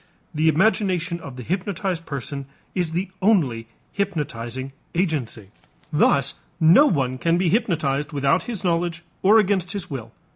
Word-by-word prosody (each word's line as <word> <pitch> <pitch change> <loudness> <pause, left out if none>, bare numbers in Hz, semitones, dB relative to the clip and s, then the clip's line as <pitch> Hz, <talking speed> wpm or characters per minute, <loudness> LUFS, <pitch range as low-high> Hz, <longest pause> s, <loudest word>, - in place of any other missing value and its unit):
The 155 +1 +3
imagination 180 0 +1
of 140 -6 -9
the 125 - -7
hypnotized 185 - -2
person 140 0 -5 0.3
is 175 -3 -1
the 185 +3 -1
only 145 - +2 0.3
hypnotizing 135 - -3 0.2
agency. 145 - -1 0.4
Thus 140 -2 +3 0.3
no 175 - +7
one 130 - 0
can 165 +3 +2
be 180 -1 +2
hypnotized 155 - 0
without 140 +3 +1
his 225 -6 -4
knowledge 170 -1 0 0.2
or 205 +4 +6
against 195 -3 +2
his 200 -7 -5
will. 115 -5 -6
165 Hz, 140 wpm, -23 LUFS, 140-185 Hz, 0.4 s, no